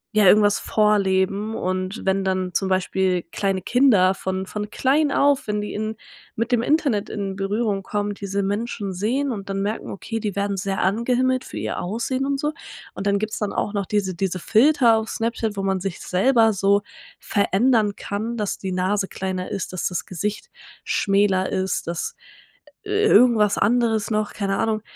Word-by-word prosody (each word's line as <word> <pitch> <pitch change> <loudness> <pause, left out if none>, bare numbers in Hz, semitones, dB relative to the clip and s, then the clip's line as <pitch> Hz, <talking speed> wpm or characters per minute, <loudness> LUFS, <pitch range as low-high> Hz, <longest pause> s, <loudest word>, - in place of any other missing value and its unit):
ja, 210 -1 +5
irgendwas 205 +1 +5
vorleben. 205 0 +1
Und 185 +3 -3
wenn 195 0 +1
dann 185 -1 -1
zum 190 +2 0
Beispiel 185 -1 +1
kleine 195 -2 -1
Kinder 220 -8 +4
von 190 0 -3
von 210 +2 -5
klein 280 +5 +2
auf, 280 -2 +2
wenn 210 0 -1
die 210 - -4
in 215 +1 -3 0.4
mit 230 +3 -2
dem 240 -2 +3
Internet 245 -7 +1
in 195 -2 -4
Berührung 200 +1 -1
kommen, 205 +1 -2
diese 200 0 -3
Menschen 205 -1 -3
sehen 250 +9 -1
und 200 -3 -6
dann 195 0 -1
merken: 210 +2 -3
„Okay, 225 +3 -5
die 210 -3 -3
werden 200 0 -1
sehr 195 +1 -2
angehimmelt 250 +5 +1
für - - -9
ihr - - -3
Aussehen 235 +8 -2
und 280 -1 -1
so.“ 300 +2 0 0.4
Und 195 - -4
dann 200 0 +3
gibt's 215 +1 -3
dann 210 -2 -2
auch 210 - -2
noch 200 -2 -2
diese 200 -3 0
diese 185 +1 -2
Filter 235 - +4
auf 220 0 -3
Snapchat, 225 -2 -2
wo 195 - -2
man 190 -1 0
sich 190 -1 -4
selber 225 +4 +3
so 200 +1 +2 0.3
verändern 210 +1 +1
kann, 220 +4 -4
dass 210 -2 -2
die 190 - -4
Nase 190 +2 0
kleiner 185 -1 -4
ist, 185 -1 -4
dass 180 - -1
das 180 - -3
Gesicht 205 +4 -4 0.3
schmäler 195 -2 +1
ist, 190 -2 -1
dass 170 0 -3 0.7
i - - -9
irgendwas 245 - +4
anderes 225 -1 +1
noch, 215 0 -1
keine 195 -1 -1
Ahnung. 220 -1 0
205 Hz, 180 wpm, -22 LUFS, 190-225 Hz, 0.7 s, ja